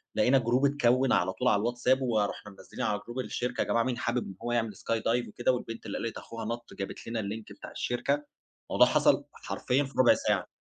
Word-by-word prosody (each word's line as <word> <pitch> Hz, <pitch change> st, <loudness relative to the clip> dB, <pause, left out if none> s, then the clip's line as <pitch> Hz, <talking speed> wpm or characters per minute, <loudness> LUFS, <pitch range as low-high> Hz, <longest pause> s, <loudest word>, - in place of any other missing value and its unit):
لقينا 135 Hz, +2 st, +4 dB
جروب 125 Hz, +3 st, +2 dB
اتكوِّن 130 Hz, -2 st, +3 dB
على 95 Hz, +2 st, +2 dB
طول 125 Hz, -, -1 dB
على 105 Hz, -4 st, +4 dB
الWhatsApp 125 Hz, +2 st, +2 dB
ورُحنا 105 Hz, -4 st, -1 dB
منزِّلين 95 Hz, -, -8 dB
على 105 Hz, -1 st, 0 dB
جروب 120 Hz, +2 st, -5 dB
الشركة 125 Hz, -1 st, -2 dB
يا -, -, +1 dB
جماعة 115 Hz, 0 st, +2 dB
مين 125 Hz, -1 st, -2 dB
حابب 120 Hz, +1 st, -1 dB
إن 95 Hz, -, -8 dB
هو 120 Hz, -, -2 dB
يعمل 115 Hz, -3 st, 0 dB
skydive 115 Hz, +1 st, 0 dB
وكده 120 Hz, +4 st, +1 dB
والبنت 115 Hz, -3 st, -5 dB
اللي 100 Hz, -, -4 dB
قالت 115 Hz, -, -4 dB
أخوها 115 Hz, -1 st, -7 dB
نَط 120 Hz, +1 st, -5 dB
جابت 100 Hz, +2 st, -6 dB
لنا 115 Hz, 0 st, -2 dB
اللينك 110 Hz, +1 st, -5 dB
بتاع -, -, -10 dB
الشركة. 140 Hz, +4 st, -1 dB, 0.5 s
الموضوع -, -, +6 dB
حصل -, -, +3 dB
حرفيًا 130 Hz, +3 st, -1 dB
في 135 Hz, 0 st, -8 dB
ربع 130 Hz, -, +7 dB
ساعة. -, -, 0 dB
120 Hz, 210 wpm, -29 LUFS, 110-125 Hz, 0.5 s, ربع